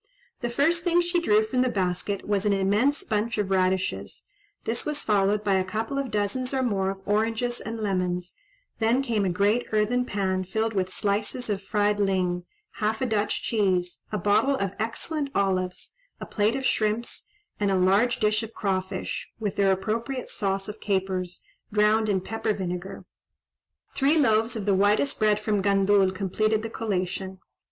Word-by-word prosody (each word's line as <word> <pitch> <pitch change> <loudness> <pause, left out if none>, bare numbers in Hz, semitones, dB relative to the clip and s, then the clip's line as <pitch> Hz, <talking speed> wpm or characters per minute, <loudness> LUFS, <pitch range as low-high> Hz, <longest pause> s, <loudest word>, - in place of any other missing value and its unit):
The 240 - -2
first 320 +7 +2
thing 350 -1 +3
she 350 0 +1
drew 215 -8 +3
from 250 +3 0
the 255 - +2
basket 190 -1 -2
was 200 -2 +1
an 205 -1 +2
immense 210 - +2
bunch 225 - -1
of 200 -2 -1
radishes; 190 0 0 0.4
this 230 +1 -1
was 300 -1 -3
followed 205 0 +2
by 200 -2 +2
a - - +1
couple 220 +8 -3
of 275 -2 -2
dozens 225 +6 -1
or 260 - +1
more 195 -5 0
of 195 0 -5
oranges 225 +3 0
and 225 0 -5
lemons; 180 -3 -1 0.5
then 235 +4 +2
came 225 -6 0
a - - +1
great 205 +6 +1
earthen 220 +4 +2
pan 190 -4 -1
filled 220 +4 -1
with 185 -2 0
slices 210 +4 -1
of 200 -1 -2
fried 205 +1 +1
ling, 180 -3 0 0.3
half 220 0 0
a - - 0
Dutch 210 -3 0
cheese, 185 -5 0
a 210 - -1
bottle 210 +8 +3
of 195 -7 -1
excellent 280 +7 -2
olives, 185 -2 -1 0.3
a - - -6
plate 215 +3 +1
of 265 -1 -3
shrimps, 220 - 0 0.3
and 205 -1 +1
a 195 - +2
large 200 +7 +3
dish 215 +1 +2
of 225 0 -8
craw 190 -3 0
fish, 190 0 -5
with 205 -3 -2
their 195 -1 +3
appropriate 230 +7 -2
sauce 195 -2 -1
of 210 0 -7
capers, 190 -3 -2 0.3
drowned 215 +1 +3
in 190 -2 +1
pepper 220 +1 -2
vinegar: 180 0 -5 0.9
three 285 +4 +3
loaves 225 -4 +3
of 215 -3 -3
the 200 - +3
whitest 205 +8 +2
bread 210 -1 +3
from 210 -1 0
Gandul 195 0 +3
completed 215 +3 0
the 225 - -5
collation. 190 -3 -3
210 Hz, 175 wpm, -26 LUFS, 195-225 Hz, 0.9 s, thing